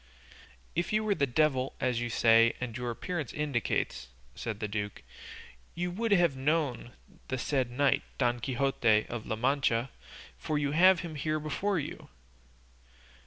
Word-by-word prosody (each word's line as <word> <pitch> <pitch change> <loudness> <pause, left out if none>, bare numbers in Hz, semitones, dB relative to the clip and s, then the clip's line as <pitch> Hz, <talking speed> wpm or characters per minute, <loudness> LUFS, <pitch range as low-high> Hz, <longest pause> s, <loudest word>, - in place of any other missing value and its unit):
"If 175 - -1
you 215 0 +2
were 215 -1 +2
the 140 -7 +1
devil, 130 0 +1
as 125 -3 0
you 120 - -2
say 115 0 +5
and 125 -2 -4
as - - -5
your 120 0 -3
appearance 150 +4 -4
indicates," 120 - -1 0.3
said 110 -3 -5
the 105 - -2
duke, 105 0 -4 0.7
"you 175 +1 -2
would 225 +5 -2
have 175 -7 +4
known 135 -3 -1 0.3
the 130 - -2
said 130 -1 0
knight 140 +3 +2 0.2
Don 120 0 +1
Quixote 120 -4 +2
of 115 -2 -5
La 110 - -1
Mancha, 125 0 +1 0.5
for 155 - -1
you 145 -1 0
have 180 +4 +5
him 170 -3 -6
here 155 +1 -1
before 190 +6 -1
you." 150 - -6
135 Hz, 160 wpm, -30 LUFS, 120-155 Hz, 0.7 s, say